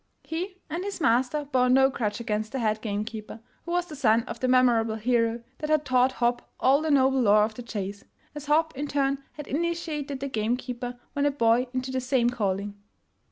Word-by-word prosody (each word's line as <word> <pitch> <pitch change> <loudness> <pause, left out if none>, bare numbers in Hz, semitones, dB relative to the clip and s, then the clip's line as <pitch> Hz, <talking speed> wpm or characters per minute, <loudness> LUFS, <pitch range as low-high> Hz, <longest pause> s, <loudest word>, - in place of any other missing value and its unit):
He 365 +4 -5
and 335 +3 -4
his 395 -2 -5
master 260 +2 +2
bore 255 -3 +2
no 265 +1 +6
grudge 210 -4 -2
against 215 -1 -3
the - - -1
head 215 -3 0
game 210 -1 -2
keeper, 220 0 -8 0.3
who 340 - -5
was 355 0 +1
the 315 -4 -9
son 230 -4 +3
of - - -7
the 255 - 0
memorable 240 -3 +3
hero 230 0 0 0.2
that 305 - -4
had 305 -1 +2
taught 255 0 +3
Hopp 240 -1 -1
all 275 +3 +4
the 315 - -1
noble 265 -2 +4
lore 210 -2 +5
of 215 +1 -1
the 245 - -8
chase, 200 -3 -5 0.3
as 295 -1 -8
Hopp 315 +1 +2
in 290 +2 -3
turn 275 -1 0
had 295 - -8
initiated 305 -3 -2
the 280 - -3
game 230 -1 0
keeper 245 -1 -6
when 285 0 +1
a - - +4
boy 245 -2 +2
into 255 0 -3
the 260 0 -1
same 250 -2 +2
calling. 205 -3 -2
255 Hz, 210 wpm, -26 LUFS, 230-285 Hz, 0.3 s, no